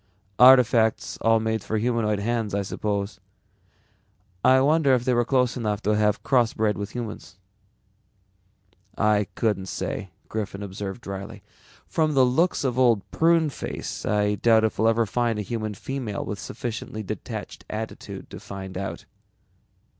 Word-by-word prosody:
"Artifacts 125 -3 +5
all 115 0 +4
made 110 0 -1
for 110 - -2
humanoid 110 -2 +1
hands 110 -1 -1
I 100 - 0
suppose. 100 +1 -3 1.2
I 130 0 +6
wonder 140 -1 +4
if 125 -1 -2
they 130 - +2
were 120 0 +3
close 125 0 +1
enough 105 -4 -2
to 105 - +2
have 105 -1 +1
crossbred 115 -5 +2
with 100 +4 -6
humans." 110 -5 -6 1.6
"I 105 -2 +2
couldn't 105 -4 0
say," 95 - -4 0.2
Griffin 105 -2 -4
observed 100 +2 -6
dryly. 100 -1 -7 0.4
"From 155 -2 0
the 130 -1 +6
looks 160 +9 +1
of 130 -2 0
Old 115 -6 +4
Pruneface 165 -3 0
I 105 0 +1
doubt 110 +1 +4
if 110 - -1
we'll 110 - +4
ever 115 0 +3
find 115 +1 0
a 105 - -2
human 110 -1 -4
female 125 -2 -4
with 105 - -5
sufficiently 110 0 -5
detached 105 -1 -6
attitude 110 +1 -6
to - - -8
find 95 -1 -7
out." 100 - -5
110 Hz, 145 wpm, -25 LUFS, 105-125 Hz, 1.6 s, I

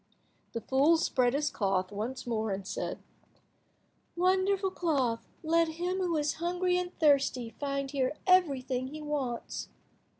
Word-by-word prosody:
The 230 - -3
fool 280 +8 +4
spread 250 -6 +2
his 295 +1 0
cloth 195 -2 0
once 225 +6 -4
more, 220 -2 -1
and 195 -1 -3
said— - - -4 1.1
"Wonderful 380 +2 +2
cloth, 270 -11 0 0.2
let 330 +1 +3
him 360 +2 -1
who 350 -3 0
is 295 -1 +1
hungry 360 +1 +1
and 360 0 -3
thirsty 275 -6 +3
find 275 -1 -2
here 275 +1 0
everything 270 -9 +2
he 305 +3 -8
wants." 275 -5 -3
285 Hz, 135 wpm, -30 LUFS, 250-345 Hz, 1.1 s, fool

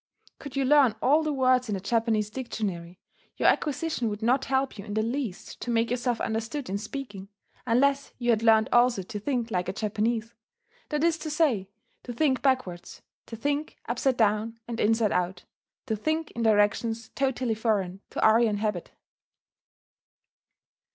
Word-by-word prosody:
Could 285 -3 -9
you 275 -1 +1
learn 270 -5 +5
all 290 +7 +4
the 310 -1 -1
words 255 -3 +2
in 205 - 0
a - - -3
Japanese 220 0 0
dictionary, 195 -8 -4 0.4
your - - +4
acquisition 295 -5 0
would 210 +1 -5
not 255 +4 +2
help 265 -3 -1
you - - -6
in 205 0 -6
the 215 - +1
least 235 -4 -4
to - - -5
make 230 0 +1
yourself 245 -1 0
understood 225 +3 -3
in 200 - -1
speaking, 210 -4 -7 0.4
unless 275 +4 +2
you 240 -1 +1
had 220 -1 +2
learned 220 -1 +5
also 240 -4 +4
to 210 +3 -6
think 240 0 -2
like 180 -2 -1
a - - -2
Japanese, 220 +2 -1 0.6
that 300 0 -1
is 330 -1 +2
to 315 - -5
say, 275 - +1 0.3
to 245 - -7
think 265 0 +1
backwards, 255 -11 -1 0.2
to 230 - -7
think 290 +6 -2
upside 245 +2 0
down 220 +1 +1
and 235 -1 -5
inside 225 0 +2
out, 180 0 -1 0.4
to 225 -4 -1
think 315 +9 -2
in 235 - -5
directions 220 +1 +2
totally 260 -3 -1
foreign 200 -4 -1
to - - -6
Aryan 220 -1 +4
habit. 210 -4 -2
230 Hz, 165 wpm, -27 LUFS, 210-265 Hz, 0.6 s, learn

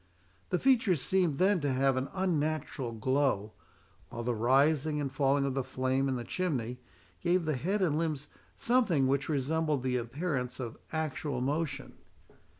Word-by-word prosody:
The - - +1
features 230 - +3
seemed 175 +1 +1
then 190 +2 +3
to 145 -3 0
have 135 +1 +2
an 130 +1 -2
unnatural 155 -8 -1
glow, 115 -3 0 0.6
while 120 - -5
the 120 +1 0
rising 140 +6 +2
and 140 -2 -2
falling 140 0 +2
of 135 - -1
the 135 0 -1
flame 130 +2 0
in 130 - 0
the 120 - -3
chimney 125 -8 -2 0.4
gave 175 0 +2
the 155 -2 0
head 190 - 0
and 155 -4 +1
limbs 150 -4 -2 0.3
something 220 - +2
which 140 +2 0
resembled 150 0 0
the 125 -1 +1
appearance 125 0 -3
of 120 -3 -5 0.2
actual 150 -4 -2
motion. 145 +4 -3
140 Hz, 155 wpm, -31 LUFS, 130-160 Hz, 0.6 s, features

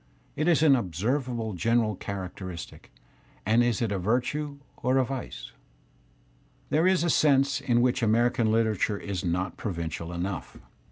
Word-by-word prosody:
Is 160 0 +2
it - - +5
an 140 -3 +7
observable 115 - -2
general 110 +3 +1
characteristic, 95 -2 -7 0.5
and 110 +4 +4
is 120 -1 +1
it 110 - -1
a 100 - -1
virtue 130 +8 -1 0.2
or 130 +2 +1
a 130 - +3
vice? 125 - -6 1.2
There 160 +4 +3
is 185 -3 +3
a 170 - +1
sense 140 -3 +3
in 120 -2 +2
which 125 0 +1
American 115 0 +2
literature 110 -2 +1
is 100 -3 -4
not 90 0 -2
provincial 85 -3 -4
enough. 90 +2 -4
115 Hz, 145 wpm, -27 LUFS, 95-130 Hz, 1.2 s, an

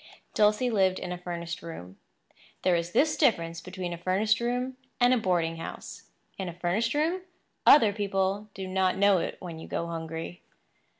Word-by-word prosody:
Dulcie 215 +4 +3
lived 190 -3 +3
in 180 - -5
a 180 - -3
furnished 170 -1 -5
room. 95 - -9 0.6
There 180 -1 +4
is 170 0 -2
this 305 - +3
difference 170 - +1
between 180 -1 -5
a 170 - -7
furnished 200 +5 +2
room 250 +2 -2 0.2
and 245 0 +5
a - - +4
boarding 170 -5 0
house. 165 - -8 0.3
In 190 -2 -3
a - - -7
furnished 180 - 0
room, 330 +5 +1 0.5
other 225 -8 +8
people 200 0 -1
do 190 -1 -5
not 185 0 +1
know 200 -1 +5
it - - -3
when 170 -3 -7
you - - -9
go 170 - -2
hungry. 165 +1 -6
185 Hz, 175 wpm, -28 LUFS, 170-215 Hz, 0.6 s, other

